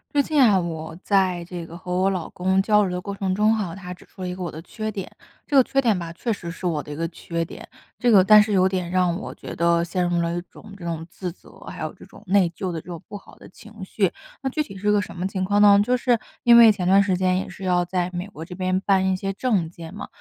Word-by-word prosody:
最 285 - +4
近 300 -1 +2
啊， 215 -6 +6
我 160 -1 -5
在 185 -3 +1
这 175 -1 -7
个 165 +1 -10
和 180 0 -8
我 190 +2 +2
老 185 -4 -3
公 190 +1 +1
交 210 +1 +3
流 - - -2
的 180 - -3
过 200 +2 -5
程 190 -2 -1
中 215 +2 +3
哈， 195 -6 -3
他 180 -2 -8
指 180 - -16
出 - - -14
了 180 - -3
一 - - -4
个 185 - -8
我 175 - -3
的 160 - -8
缺 215 +5 -5
点， 195 -3 -6 0.3
这 285 - +1
个 265 - +8
缺 275 0 +1
点 220 -7 +2
吧， 170 -1 -6
确 230 +7 -3
实 190 -5 -4
是 180 +2 -8
我 160 -4 0
的 150 - -13
一 145 - -5
个 165 +2 -2
缺 170 0 -4
点， 165 - -10 0.3
这 245 - +2
个 200 -5 +7
但 210 +2 +8
是 210 0 0
有 190 0 +4
点 185 -2 -2
让 180 -1 +2
我 - - -7
觉 - - -8
得 170 0 +3
陷 180 +1 -1
入 175 -1 +1
了 170 0 -1
一 - - -2
种 210 - -14
这 170 - -10
种 165 -1 -4
自 180 0 -6
责， - - -19
还 - - -6
有 - - -4
这 - - -15
种 - - -16
内 190 -1 +4
疚 185 -2 -3
的 165 - -4
这 - - -15
种 175 -1 -8
不 205 - -6
好 195 - -16
的 - - -15
情 215 +1 -13
绪。 190 0 0 0.3
那 270 - -1
具 305 +3 -1
体 195 -8 -11
是 205 - -4
一 - - +5
个 205 - +3
什 - - -8
么 180 +1 -3
情 190 -1 -3
况 205 +2 +2
呢？ 205 -1 +8
就 250 +3 +1
是， 245 -1 +2 0.3
因 240 0 +7
为 230 -2 +9
前 185 -4 -2
段 195 +2 +6
时 190 -2 0
间 185 0 +1
也 190 - -3
是 190 +1 -9
要 180 -1 +2
在 180 0 -2
美 175 +1 -3
国 165 -5 -9
这 180 - -9
边 185 0 0
办 190 -1 +2
一 185 - 0
些 195 +1 -3
证 200 -7 0
件 165 0 -10
嘛， 205 - -7
185 Hz, 320 characters per minute, -23 LUFS, 175-205 Hz, 0.3 s, 为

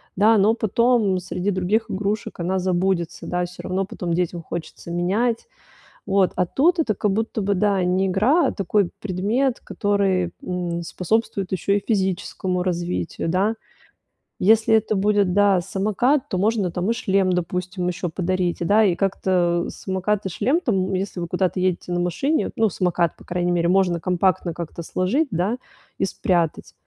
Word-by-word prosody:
да, 215 +3 +5
но 205 +3 +4
потом 225 -3 +2
среди 180 +2 -2
других 205 +5 0
игрушек 205 +1 -3
она 185 +2 0
забудется, 180 -1 -1
да, 180 0 -1
всё 180 +1 -10
равно 190 +1 -1
потом 175 -3 -4
детям 175 0 -1
хочется 170 +1 -7
менять. 210 - 0 0.6
Вот, 195 -2 +2
а 180 - +2
тут 330 - +2
это 220 -11 +1
как 205 0 0
будто 220 +2 -1
бы, 200 +1 +1
да, 200 -1 +1
не 185 +2 +1
игра, 235 - +3
а - - 0
такой 195 -1 +1
предмет, 210 +7 0
который, 195 -3 0
м, 175 -2 -3
способствует 195 +2 -1
ещё 190 +2 0
и 205 - 0
физическому 190 -3 -1
развитию, 175 -2 -2
да. 195 +6 +1 0.9
Если 220 +2 +4
это 220 -1 +2
будет, 200 -2 +2
да, 200 -2 +4
самокат, 215 - 0
то 185 - -1
можно 205 -2 +1
там 180 +4 -2
и - - +3
шлем, 195 -4 +1
допустим, 180 +1 -2
ещё 180 0 -2
подарить. 180 0 -1
И, - - 0
да, 210 +4 +4
и 180 -3 +2
как-то 180 -3 +1
самокат 190 +2 -2
и - - -1
шлем, 260 - +1
там 190 - 0
если 190 -1 -3
вы 170 - -3
куда-то 185 +1 0
едете 180 -1 -1
на 175 - 0
машине, 270 - 0
ну, 220 -1 +2
самокат, 175 -2 0
по - - -16
крайней 175 0 -1
мере, 170 -1 +1
можно 180 -2 +2
компактно 180 -1 +1
как-то 170 0 -6
сложить, 195 - 0
да, 190 +7 0 0.4
и - - +1
спрятать. 170 -5 -1
190 Hz, 170 wpm, -22 LUFS, 180-210 Hz, 0.9 s, да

